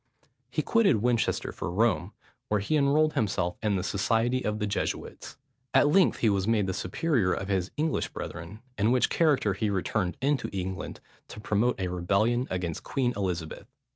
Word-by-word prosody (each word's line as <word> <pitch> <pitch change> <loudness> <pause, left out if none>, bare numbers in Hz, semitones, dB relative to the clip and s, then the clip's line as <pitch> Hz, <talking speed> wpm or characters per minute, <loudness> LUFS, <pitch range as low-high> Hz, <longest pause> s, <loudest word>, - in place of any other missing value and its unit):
He - - -1
quitted 200 - +3
Winchester 120 -2 +1
for - - -5
Rome, 110 +6 +1 0.3
where 105 - +1
he 105 +10 -1
enrolled 150 +2 +3
himself 95 - -1
in 105 -2 +1
the 90 - -1
society 115 +6 +1
of 105 0 -1
the 105 - -1
Jesuits. 100 0 -4 0.4
At 145 - +6
length 185 +3 +3
he 115 - +4
was 100 0 0
made 110 -3 +2
the 95 - -2
superior 100 - 0
of 100 - -4
his 95 -2 0
English 155 +1 0
brethren, 90 +6 -7 0.2
in 105 +3 +3
which 125 0 +2
character 145 - +2
he 105 +2 -1
returned 95 -1 -1
into 140 +1 0
England, 95 -2 -5 0.3
to 105 - -10
promote 105 +3 0
a 95 - -1
rebellion 100 +8 +1
against 90 -3 -3
Queen 125 -3 -1
Elizabeth. 90 -5 -3
105 Hz, 170 wpm, -28 LUFS, 95-125 Hz, 0.4 s, At